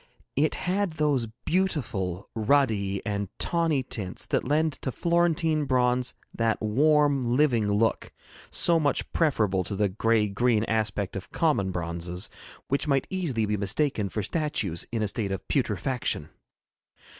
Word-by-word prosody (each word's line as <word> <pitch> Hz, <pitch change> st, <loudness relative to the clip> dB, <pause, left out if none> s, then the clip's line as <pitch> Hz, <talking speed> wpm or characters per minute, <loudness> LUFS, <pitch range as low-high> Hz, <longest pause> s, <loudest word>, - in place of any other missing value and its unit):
It 150 Hz, +2 st, +2 dB
had 190 Hz, -1 st, -1 dB
those 145 Hz, -6 st, +1 dB, 0.2 s
beautiful 110 Hz, -, -1 dB
ruddy 110 Hz, -5 st, +1 dB
and 100 Hz, -2 st, -2 dB
tawny 165 Hz, -5 st, +2 dB
tints 100 Hz, -7 st, -5 dB
that -, -, 0 dB
lend 155 Hz, +1 st, +2 dB
to 130 Hz, -, -2 dB
Florentine 165 Hz, -1 st, +1 dB
bronze 125 Hz, -1 st, +1 dB, 0.2 s
that 115 Hz, -1 st, 0 dB
warm 145 Hz, +5 st, +3 dB
living 120 Hz, -4 st, +2 dB
look 110 Hz, +2 st, +1 dB, 0.4 s
so 170 Hz, -1 st, +4 dB
much 145 Hz, -3 st, -1 dB
preferable 105 Hz, -, +2 dB
to 100 Hz, -, -5 dB
the 105 Hz, 0 st, +1 dB
gray 110 Hz, +2 st, +2 dB
green 110 Hz, +2 st, +1 dB
aspect 105 Hz, -4 st, -1 dB
of 95 Hz, -, -7 dB
common 145 Hz, -, +1 dB
bronzes, 85 Hz, +1 st, -3 dB, 0.4 s
which 140 Hz, +3 st, -1 dB
might 135 Hz, -2 st, +2 dB
easily 155 Hz, -, 0 dB
be 105 Hz, 0 st, -1 dB
mistaken 105 Hz, +1 st, 0 dB
for 105 Hz, +3 st, -3 dB
statues 130 Hz, -, -1 dB
in 115 Hz, -2 st, -1 dB
a -, -, +1 dB
state 100 Hz, -1 st, -2 dB
of 95 Hz, -1 st, -5 dB
putrefaction. 120 Hz, -, 0 dB
120 Hz, 140 wpm, -27 LUFS, 100-150 Hz, 0.4 s, so